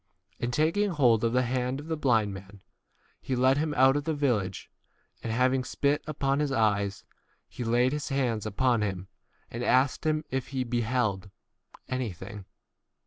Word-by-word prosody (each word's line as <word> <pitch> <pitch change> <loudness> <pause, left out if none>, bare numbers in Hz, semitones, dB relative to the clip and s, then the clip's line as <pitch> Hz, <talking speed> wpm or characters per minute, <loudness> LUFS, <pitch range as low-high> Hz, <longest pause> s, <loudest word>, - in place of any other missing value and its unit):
And 120 - -2
taking 165 +10 +2
hold 125 - +3
of 115 - +2
the 125 0 +3
hand 125 +2 -1
of 145 - -9
the 160 0 -2
blind 115 -9 +2
man 95 +1 -11 0.6
he 130 - -2
led 130 +3 +3
him 155 0 0
out 130 +1 +6
of 145 0 -1
the 160 -1 -1
village, 125 -10 -1 0.5
and 115 - -4
having 130 +3 +2
spit 140 +3 0
upon 140 -2 0
his 150 -2 0
eyes, 100 -5 +1 0.4
he 125 - -7
laid 120 +2 +2
his 150 -1 -3
hands 120 -6 -1
upon 120 +2 +1
him, 95 -3 -3 0.4
and 120 +1 -4
asked 130 +2 +2
him 155 0 0
if 130 -1 -2
he 130 -2 -2
beheld 120 -4 0
T - - -14 0.6
24 130 - -1
anything. 100 -4 -5
125 Hz, 175 wpm, -28 LUFS, 110-140 Hz, 0.6 s, out